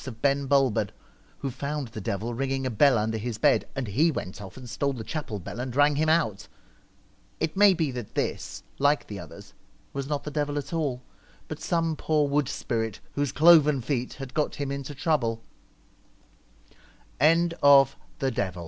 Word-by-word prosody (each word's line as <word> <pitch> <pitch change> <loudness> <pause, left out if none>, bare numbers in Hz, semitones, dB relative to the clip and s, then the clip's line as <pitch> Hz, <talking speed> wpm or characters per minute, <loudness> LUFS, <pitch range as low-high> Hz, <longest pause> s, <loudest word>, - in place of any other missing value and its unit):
Twilight, 130 -5 -7
of 115 - -28
Ben 140 0 +2
Bulben, 135 -5 +2 0.5
who 135 - -4
found 140 0 -4
the 110 - -7
devil 105 +5 -3
ringing 135 +2 -2
a 130 - -1
bell 130 +3 +4
under 110 +1 -1
his 115 0 -4
bed, - - +3
and 135 -2 -2
he 140 - +3
went 95 - -5
off 95 +1 -10
and 130 -1 -9
stole 140 +5 -1
the 120 -4 -6
chapel 145 -6 -4
bell 100 +4 -8
and 125 0 -4
rang 145 +1 +4
him 155 +2 +1
out. 115 - +1 0.9
It 160 -1 -1
may 200 -1 +6
be 160 -5 0
that 125 -4 -7
this, - - -3 0.2
like 145 +1 +2
the 100 -2 -7
others, 100 0 -12 0.4
was 140 0 -4
not 145 -1 -2
the 150 - -5
devil 145 -1 -1
at 145 +2 -5
all, 140 -6 -1 0.4
but - - -6
some 165 -2 0
poor 150 -1 +1
wood 140 -1 +1
spirit 110 -4 -3
whose 145 -2 -1
cloven 150 -2 +6
feet 125 0 -2
had 135 -2 -8
got 150 - -1
him 140 -1 -3
135 Hz, 165 wpm, -26 LUFS, 115-150 Hz, 0.9 s, may